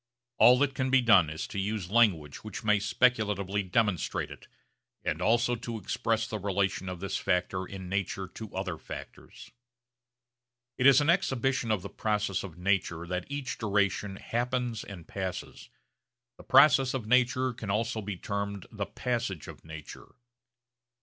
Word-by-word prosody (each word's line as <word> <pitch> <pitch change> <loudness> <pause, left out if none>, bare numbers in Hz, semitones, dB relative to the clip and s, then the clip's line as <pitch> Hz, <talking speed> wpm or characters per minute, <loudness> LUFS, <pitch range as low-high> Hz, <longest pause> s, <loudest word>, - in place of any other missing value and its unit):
All 125 +1 +8
that 140 0 +2
can 130 0 -1
be 135 0 +5
done 100 -10 +5
is 80 +1 -4
to 100 - -5
use 100 -2 -3
language 95 -11 +3
which 110 -3 -7
may 105 -1 +3
speculatively 105 -3 +1
demonstrate 100 0 0
it, - - -12 0.6
and 80 +4 -2
also 120 +4 +3
to 115 0 -5
express 110 +1 -1
the 110 -1 -4
relation 95 -1 -1
of 90 -1 -6
this 100 0 -2
factor 95 +1 -1
in 95 -2 -8
nature 95 0 -2
to 110 -2 -9
other 95 -4 -3
factors. - - -10 1.3
It 130 - +6
is 140 +1 +7
an 150 +3 +4
exhibition 135 -8 0
of 105 -4 0
the 100 - -6
process 105 -3 -1
of 90 -4 -9
nature 90 -3 0
that 90 +4 -4
each 140 -2 -4
duration 100 -2 0
happens 120 +1 -2
and 90 -5 -10
passes. 95 -2 -6 0.7
The - - -13
process 135 -2 +6
of 125 -5 -3
nature 125 +2 +2
can 110 -3 -7
also 110 +2 0
be 100 -2 -5
termed 100 0 -4
the 105 -2 -4
passage 120 - -3
of - - -11
nature. 80 -2 -10
105 Hz, 155 wpm, -29 LUFS, 95-120 Hz, 1.3 s, All